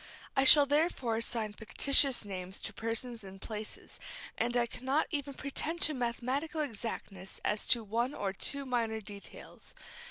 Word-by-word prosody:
I 270 -1 +4
shall 290 +1 +9
therefore 285 -5 +1
assign 225 -2 -1
fictitious 250 +4 +4
names 190 -1 -5
to - - -5
persons 230 0 -2
and 195 0 -10
places, 215 +1 -7 0.4
and 240 +1 0
I 240 - +3
cannot 265 +5 0
even 285 -3 -3
pretend 305 +5 -2
to 310 - +2
mathematical 260 +5 -2
exactness 210 -7 -5
as 210 0 0
to 235 -2 +4
one 235 +6 -1
or 195 -1 -2
two 280 +7 -1
minor 230 -3 -1
details. 205 -1 -11
235 Hz, 150 wpm, -32 LUFS, 215-275 Hz, 0.4 s, shall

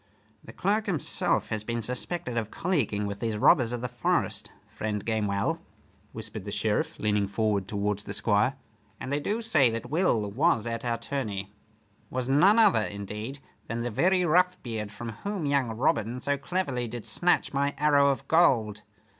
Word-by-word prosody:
"The - - -11
clerk 210 +3 0
himself 175 -7 0
has 110 -1 -3
been 115 +1 -3
suspected 125 +3 -4
of 110 -2 -1
colleaguing 120 - -1
with 100 0 -4
these 115 -2 -2
robbers 120 +2 +4
of 120 -1 -3
the 125 - -2
forest, 120 0 -1 0.2
friend 105 -1 -4
Gamewell," 105 -3 0 0.5
whispered - - -7
the - - -6
Sheriff, - - -1
leaning 105 -1 +1
forward 100 -1 0
towards 105 0 -1
the - - -7
Squire. 105 +5 +2 0.4
"And 130 - -5
they 145 - +1
do 215 +9 -2
say 155 - +4
that 115 +3 -5
Will 120 - +1
was 125 -1 +2
at 115 -1 -3
our 120 -1 0
tourney 110 -6 -4 0.6
was 125 -1 -3
none 180 +11 +5
other, 170 - +5
indeed, 105 +5 -5 0.3
than 115 0 -3
the 120 0 -2
very 180 - +3
Roughbeard 155 - +1
from 115 +2 -7
whom 200 -5 -3
young 140 -4 +1
Robin 115 +1 0
so 140 +2 0
cleverly 140 -5 -2
did 120 0 -7
snatch 175 -3 +1
my 140 +1 0
arrow 145 -1 +4
of 135 - -2
gold. 110 -11 +3
120 Hz, 170 wpm, -28 LUFS, 105-145 Hz, 0.6 s, none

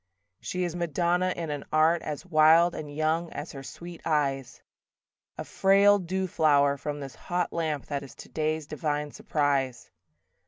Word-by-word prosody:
II - - -22
She 180 0 -1
is 175 -1 -3
madonna 175 +2 0
in 165 -3 -4
an 145 -1 -4
art 160 +2 +3
As 150 +3 -5
wild 165 +1 +5
and 150 -2 -6
young 155 +3 -1
as 145 +3 -6
her 135 - -8
sweet 170 +5 -10
eyes: 135 -5 -1 0.7
A - - -4
frail 200 +1 +4
dew 190 +1 -2
flower 145 -5 +3
from 145 +1 -5
this 135 -2 -7
hot 175 -1 -3
lamp 155 -4 -2
That 140 -1 -3
is 140 - -11
today's 155 0 -3
divine 150 -1 -3
surprise. 140 -6 -1
155 Hz, 160 wpm, -27 LUFS, 145-170 Hz, 0.7 s, wild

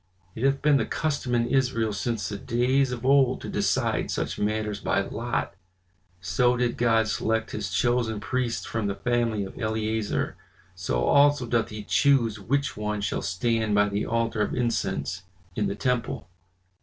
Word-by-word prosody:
"It 110 - -6
hath 135 0 +2
been 150 -1 +5
the - - -1
custom 140 -6 -1
in 120 0 +2
Israel 120 -5 +1
since 105 0 -2
the 100 - -4
days 125 +4 +1
of 125 0 -5
old 135 -2 +4
to - - -6
decide - - 0
such - - -2
matters 105 0 -1
by - - +1
lot. - - -3 0.7
So 120 +7 +2
did 120 -1 0
God 115 -2 +2
select 110 +1 -1
his - - -3
chosen 120 -3 +1
priests 125 +1 -2
from 110 -2 -2
the 100 - -2
family 115 0 0
of 95 - -10
Eleazar. 110 -1 -1 0.4
So - - -2
also 145 - +4
doth 115 -1 0
he 105 -1 -7
chose 115 -3 +2
which 140 +8 -1
one 105 0 -2
shall 100 - -1
stand 110 +3 0
by 105 0 +4
the 100 +1 -2
altar 115 -2 0
of 105 - 0
incense 100 - -1 0.3
in 105 - 0
the 100 - -2
temple." 125 +2 -1
115 Hz, 170 wpm, -26 LUFS, 105-125 Hz, 0.7 s, been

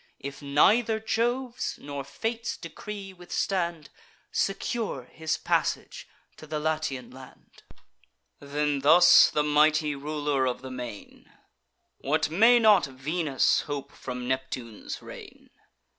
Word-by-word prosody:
If 140 +1 -7
neither 215 +11 +3
Jove's 240 +3 -1
nor 140 -1 -6
Fate's 225 - -4
decree 195 +3 -8
withstand, 175 -3 -3 0.4
Secure 200 - -2
his 160 +5 -3
passage - - -1 0.3
to 155 - -12
the 155 0 -3
Latian 155 -4 -2
land." 130 0 -15 0.8
Then 145 0 -1
thus 160 +6 +7
the 150 - 0
mighty 150 0 +3
Ruler 145 -1 -1
of 125 0 -3
the 130 - -7
Main: 125 -5 -9 0.7
"What 155 +3 0
may 230 +8 +6
not 215 -8 +5
Venus 140 +2 0
hope 140 -1 -5
from 125 -1 -6
Neptune's 130 -4 -4
reign? - - -12
150 Hz, 115 wpm, -27 LUFS, 135-185 Hz, 0.8 s, thus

